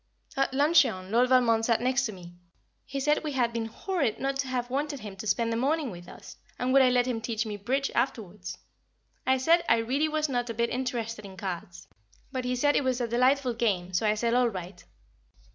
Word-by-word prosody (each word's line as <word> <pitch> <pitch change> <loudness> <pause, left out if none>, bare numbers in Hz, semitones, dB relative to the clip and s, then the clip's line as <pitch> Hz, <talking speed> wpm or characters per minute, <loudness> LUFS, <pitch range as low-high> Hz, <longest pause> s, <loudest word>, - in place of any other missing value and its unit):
At 270 0 +1
luncheon 265 - +3
Lord 245 +3 +3
Valmond 235 -3 +4
sat 230 -1 +2
next 255 +1 +1
to - - -5
me; 175 -3 -11 0.5
he 275 0 -4
said 300 +3 +1
we 300 -2 -3
had 240 -3 +1
been 230 -1 -2
horrid 280 - -2
not 275 0 -1
to 275 -1 -2
have 250 -1 -3
wanted 285 +1 -2
him 205 -2 -8
to 215 - -6
spend 230 +3 +1
the - - -1
morning 280 +1 0
with 175 -1 -10
us, - - -12 0.2
and 255 +1 0
would 275 - +7
I 255 - +5
let 245 -1 +3
him 240 -3 -2
teach 225 -1 -2
me 210 -1 -4
"Bridge" 260 +7 -1
afterwards? 185 -7 -3 0.7
I 260 0 +4
said 330 +6 +3
I 230 - +5
really 265 +7 0
was 310 0 0
not 245 -3 -2
a 230 - -4
bit 235 +1 0
interested 235 -4 -3
in 190 -1 -11
cards, 175 -2 -6 0.4
but 255 -2 -3
he 250 0 0
said 290 +3 +2
it - - +2
was 260 -1 0
a 240 - -1
delightful 255 +2 +2
game, 195 -6 -1
so 200 +5 +1
I 210 - +3
said 230 +2 0
All 245 -1 +3
right. 185 -2 -8
245 Hz, 225 wpm, -28 LUFS, 220-270 Hz, 0.7 s, would